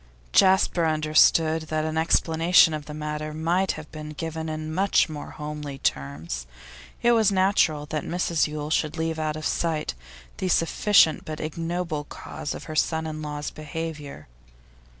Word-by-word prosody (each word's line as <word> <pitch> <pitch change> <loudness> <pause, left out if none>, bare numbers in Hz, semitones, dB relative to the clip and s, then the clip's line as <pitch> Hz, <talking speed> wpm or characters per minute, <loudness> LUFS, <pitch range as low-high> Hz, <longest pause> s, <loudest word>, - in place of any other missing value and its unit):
Jasper 185 -3 +4
understood 155 +1 +3
that 155 0 -1
an 155 0 -2
explanation 165 +1 +4
of 150 -1 -5
the 150 - -7
matter 150 0 -4
might 175 +4 +1
have 155 -1 -10
been 155 -1 -7
given 160 +1 -4
in 155 0 -4
much 195 +3 +3
more 150 -2 -7
homely 150 -2 -6
terms; 70 - -3 0.6
it 240 - +5
was 220 -4 +4
natural 185 -6 +2
that 155 0 -3
Mrs 170 -3 0
Yule 150 0 -5
should 155 -1 0
leave 160 0 -2
out 155 -1 -1
of 155 -1 -6
sight 160 - -1 0.4
the 190 - -2
sufficient, 170 0 +3
but 155 -1 -6
ignoble, 165 -1 -3
cause 145 - -6
of - - -8
her 155 - -7
son 160 +1 +1
in 155 -1 -5
law's 150 -1 -4
behaviour. 155 - -7
155 Hz, 155 wpm, -25 LUFS, 150-165 Hz, 0.6 s, it